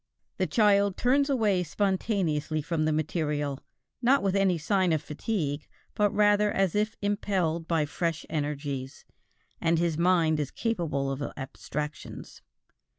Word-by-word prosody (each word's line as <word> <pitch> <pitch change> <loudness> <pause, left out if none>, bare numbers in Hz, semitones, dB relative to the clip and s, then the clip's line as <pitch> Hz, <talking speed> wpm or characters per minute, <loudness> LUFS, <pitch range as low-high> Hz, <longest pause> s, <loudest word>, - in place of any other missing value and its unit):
The - - +1
child 200 -3 +3
turns 275 +3 +2
away 215 -9 +2
spontaneously 175 -4 0
from 160 0 -1
the 155 - +2
material, 150 -2 -1 0.4
not 265 +3 +4
with 195 -1 +1
any 195 -3 +3
signs 180 +1 +2
of 155 - -3
fatigue, 150 -2 -3 0.3
but 210 0 +2
rather 210 0 +3
as 195 -3 +1
if 210 +1 0
impelled 185 -5 0
by 160 -3 +1
fresh 165 +2 -2
energies, 145 -3 -4 0.6
and 165 0 +2
his 165 -1 0
mind 170 -3 +3
is 145 -2 -1
capable 155 - -1
of 135 +1 -4 0.2
abstractions. 150 +2 -6
170 Hz, 135 wpm, -28 LUFS, 150-205 Hz, 0.6 s, not